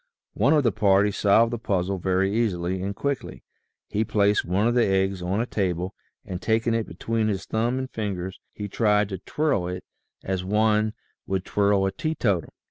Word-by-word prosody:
One 130 +9 +3
of 150 -2 +4
the 120 - +3
party 100 0 +3
solved 110 +4 +3
the 120 - -2
puzzle 95 -3 -1
very 95 +2 +1
easily 95 -5 0
and 100 +1 -3
quickly. 140 +2 -3 0.4
He 105 - 0
placed 105 -1 +2
one 95 +5 +1
of 120 - +2
the 120 -1 +3
eggs 95 -1 +1
on 90 +4 -1
a 115 - +1
table 90 -5 -2 0.3
and 90 -1 -5
taking 115 +1 +1
it 115 -1 -1
between 115 -1 -1
his 100 -2 -2
thumb 120 +3 0
and 130 0 -2
fingers 95 -6 -4
he 105 - -6
tried 105 -1 +2
to 95 -3 -5
twirl 120 - 0
it 90 +1 -5 0.4
as 95 -1 -2
one 105 +2 +2 0.3
would 95 -1 -1
twirl 100 -1 +2
a 95 - 0
teetotum. 105 - -1
100 Hz, 185 wpm, -25 LUFS, 95-110 Hz, 0.4 s, of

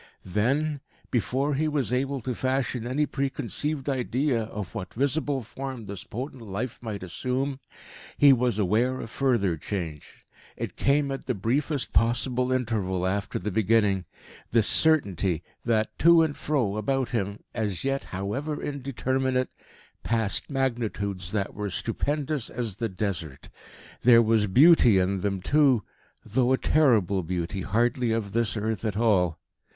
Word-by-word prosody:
Then, 135 - 0 0.3
before 130 - 0
he 155 +3 +1
was 145 -5 0
able 135 +1 -1
to 125 +2 -3
fashion 130 -1 -1
any 140 +4 +1
preconceived 140 +1 -2
idea 130 -2 0
of 105 -4 -7
what 95 -5 -6
visible 140 +1 0
form 130 0 -7
this 100 -2 -6
potent 130 +2 -6
life 110 +3 -5
might 105 -5 -5
assume, 130 +9 -2 0.6
he 140 -1 +7
was 125 -4 +1
aware 110 +6 +1
of 115 - -7
further 115 -12 +1
change. 80 -4 -6 0.3
It - - -5
came 140 0 +2
at 135 - -5
the 125 - 0
briefest 135 - -1
possible 125 +2 +1
interval 105 -8 -1
after 100 +2 -1
the 105 - -3
beginning 100 -2 +2 0.4
this 115 -2 +3
certainty 100 - +3 0.2
that, 110 -2 +1
to 170 +1 +7
and 150 -2 -1
fro 120 -9 -1
about 130 +3 0
him, 100 -3 -2
as 105 -6 -2
yet 135 0 -1
however 125 +11 -3
indeterminate, 130 -2 -1 0.5
passed 110 -3 0
Magnitudes 110 - -2
that 100 -2 -2
were 105 0 -4
stupendous 145 - -2
as 115 -5 -4
the 115 0 -2
desert. 90 -7 -4 0.5
There 115 -1 +7
was 110 -1 +2
beauty 125 - +6
in 95 +1 +1
them 95 -2 -2
too, 140 -6 +3 0.4
though 130 0 +2
a - - +3
terrible 110 - +3
beauty 90 +2 -3
hardly 120 +4 +1
of 110 -3 -1
this 115 +1 0
earth 110 -1 -2
at 105 -3 -2
all. 95 -8 +2
115 Hz, 145 wpm, -26 LUFS, 100-135 Hz, 0.6 s, he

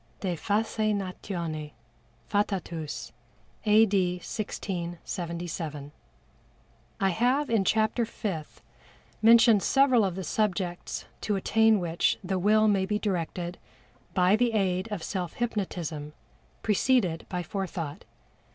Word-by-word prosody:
De 185 -3 -1
Faseinatione 195 -6 -2 0.5
Fatatus. 175 - -2 0.6
A. 215 +1 +7
D. 190 -4 +1
1677. 170 -5 -5 1.1
I 195 - +3
have 250 +9 +1
in 220 -4 +3
Chapter 220 +4 +2
Fifth 170 -9 -5 0.6
mentioned 230 -1 +7
several 265 -2 +4
of 190 -3 -1
the 190 - -4
subjects 180 -1 -2 0.2
to 210 - 0
attain 220 +2 +3
which 170 -1 +1
the 190 0 -1
Will 215 +3 +4
may 195 -2 +2
be 210 +1 +1
directed 175 -3 -3 0.6
by 185 +2 +5
the 235 +1 +2
aid 190 0 0
of 195 -6 -3
self 180 -4 -3
hypnotism, 175 -10 -3 0.5
preceded 210 -6 +2
by 180 -1 -2
Forethought. 170 -5 -4
190 Hz, 105 wpm, -28 LUFS, 175-215 Hz, 1.1 s, A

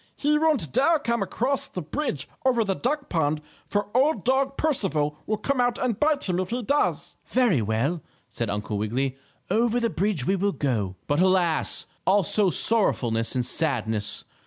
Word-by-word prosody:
He 300 +1 +2
won't 295 - +1
dare 330 +4 +4
come 235 -5 -1
across 245 +8 -1
the 180 - -6
bridge 160 - -3 0.2
over 250 -3 +3
the 195 -2 0
duck 285 +8 -2
pond, 155 -2 0 0.3
for 205 +1 -2
Old 285 +4 +2
Dog 270 +2 +1
Percival 175 - 0
will 215 - 0
come 255 +5 0
out 245 -1 +1
and 240 -5 -1
bite 295 -4 +2
him 180 -1 0
if 185 - -2
he 245 +1 -2
does." 285 +6 0
"Very 235 - +2
well," 115 - -1 0.3
said 115 -2 -4
Uncle 105 0 -3
Wiggily, 130 +5 -1 0.4
"over 235 +1 +2
the 230 -2 0
bridge 190 -7 0
we 195 - +2
will 200 +1 0
go." 110 -10 -1
But 145 +1 0
alas! 180 -3 +2 0.2
Also 200 +1 +3
sorrowfulness 120 - +1
and 125 -1 0
sadness! 110 -10 -1
195 Hz, 170 wpm, -25 LUFS, -, 0.4 s, dare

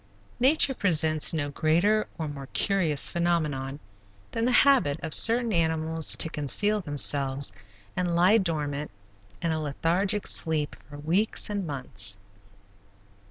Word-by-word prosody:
Nature 270 +2 +3
presents 160 - +2
no 145 -3 -3
greater 175 +9 0
or 160 -2 -4
more 140 -2 -9
curious 170 -8 +1
phenomenon 150 -6 -2 0.5
than 230 0 -2
the 250 - +1
habit 240 - +2
of 160 -2 -3
certain 230 -1 +5
animals 160 -1 +1
to - - 0
conceal 205 +8 0
themselves 140 - +1 0.4
and 175 -2 -2
lie 185 +6 +4
dormant, 150 -5 -3 0.5
in 165 - -1
a 160 0 -3
lethargic 180 +8 -1
sleep, 155 -3 +1
for 145 - -11
weeks 180 +9 -1
and 200 -4 -4
months. 125 -8 -3
160 Hz, 125 wpm, -25 LUFS, 145-195 Hz, 0.5 s, certain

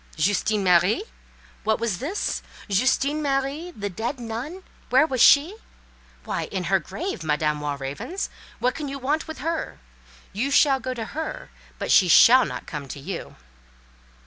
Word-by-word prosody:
"Justine 205 +5 +1
Marie!" 180 - +3 0.6
What 220 0 +1
was 225 -6 -1
this? 345 +10 -2 0.3
Justine 265 +8 +1
Marie—the 275 - -2
dead 235 +8 -4
nun—where 260 +3 -1
was 260 -6 -1
she? 305 +8 +6 0.7
Why, - - -3
in - - -4
her - - +2
grave, 380 - -5
Madame 150 -1 0
Walravens—what 145 - -4
can 300 0 -5
you 275 - -5
want 290 +5 -1
with 315 - -7
her? 330 +3 -3 0.6
You 235 +8 -1
shall 275 -1 +4
go 255 0 -4
to 225 -2 -4
her, 315 +2 -5 0.3
but - - -3
she 185 - +6
shall 250 +8 +7
not - - -6
come 145 -2 -6
to 140 - -7
you. 170 +5 -6
250 Hz, 145 wpm, -24 LUFS, 190-290 Hz, 0.7 s, shall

